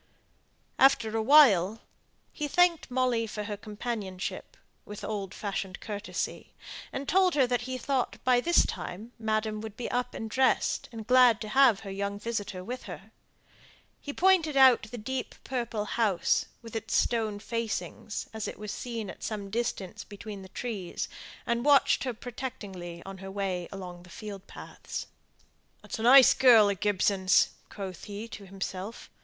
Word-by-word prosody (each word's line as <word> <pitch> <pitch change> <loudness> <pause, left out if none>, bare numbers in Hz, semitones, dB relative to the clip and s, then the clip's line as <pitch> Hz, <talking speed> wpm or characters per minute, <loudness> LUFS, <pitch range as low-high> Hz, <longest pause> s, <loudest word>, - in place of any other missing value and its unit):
After 230 -5 +4
a 225 - +1
while, 220 - +6 0.5
he 300 - -3
thanked 350 0 +3
Molly 250 -3 +1
for 210 0 -5
her 205 0 -4
companionship, 210 - -5 0.3
with 210 0 -9
old 200 -3 -4
fashioned 195 -2 -4
courtesy; 210 -1 -5 0.4
and 270 0 -5
told 370 -1 +3
her 275 -3 +5
that 245 0 -1
he 255 - -2
thought, 255 0 -1
by 250 -1 +4
this 345 +5 +4
time, 210 +7 -6
madam 215 -1 -1
would 220 -1 -8
be 245 - -4
up 245 0 -1
and 225 - -4
dressed, 260 +4 +1
and 225 -2 -7
glad 250 -2 +6
to 215 - -5
have 250 -3 +5
her 195 - -7
young 200 +1 -3
visitor 205 -4 -4
with 250 +6 -6
her. - - -9 0.9
He 285 - -6
pointed 335 -3 +3
out 260 -4 +6
the 245 - -7
deep 255 +4 -4
purple 235 -4 -3
house, 210 -6 +1 0.2
with 230 -1 -10
its 225 0 -2
stone 220 -3 +1
facings, 225 -1 -4
as 220 -1 -4
it - - -6
was 210 -1 -6
seen 230 -4 -5
at - - -9
some 205 -3 -4
distance 220 -5 -3
between 205 -1 -9
the 190 - -11
trees, 205 -5 -4 0.4
and 235 0 0
watched 285 -1 +4
her 250 - -1
protectingly 200 -8 -7
on 195 -1 -8
her 195 0 -8
way 190 -3 -3
along 180 -3 -8
the 180 - -16
field 200 +1 -8
paths. - - -7 0.8
"That's - - -6
a - - -3
nice 255 +3 +8
girl 230 -5 +7
of 195 - -5
Gibson's," 195 -2 +3 0.2
quoth 190 -4 -7
he 205 +2 -6
to 200 -3 -9
himself. 195 +2 -6
220 Hz, 160 wpm, -29 LUFS, 200-250 Hz, 0.9 s, nice